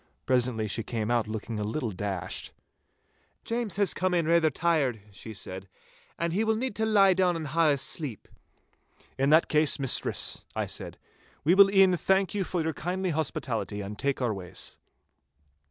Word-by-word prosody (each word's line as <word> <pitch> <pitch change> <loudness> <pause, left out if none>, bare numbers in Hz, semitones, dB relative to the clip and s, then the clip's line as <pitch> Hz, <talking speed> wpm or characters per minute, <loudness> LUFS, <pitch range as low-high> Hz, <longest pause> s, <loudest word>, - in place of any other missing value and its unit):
Presently 125 -4 +1
she 110 +3 -1
came 110 0 -3
out 120 -2 +1
looking 110 0 -5
a - - -2
little 115 +2 -2
dashed. 95 -3 -4 0.9
'James 230 -5 -2
has 200 -1 +2
come 185 -1 0
in 170 -2 +1
raither 165 -1 +4
tired,' 150 -6 0
she 100 +3 -9
said, 95 -2 -7 0.5
'and 170 0 -1
he 205 +5 +1
will 220 0 +1
need 245 -1 -3
to 220 0 +1
lie 200 -3 +5
down 180 -1 +2
and 160 -3 -4
hae 160 0 +3
a - - -1
sleep.' 135 - -3 0.9
'In 135 +1 +2
that 160 +2 +5
case, 150 -1 +3
mistress,' 135 -3 +1
I - - -1
said, - - -7 0.5
'we 160 +5 +4
will 195 +1 +7
e'en 195 -2 +5
thank 190 +2 +1
you 205 -2 0
for 175 -2 -2
your 160 0 -1
kindly 180 +4 -2
hospitality 125 -8 -2
and 100 +1 -7
take 140 -2 -1
our 120 -3 +1
ways. 90 -3 -6
155 Hz, 175 wpm, -28 LUFS, 115-185 Hz, 0.9 s, will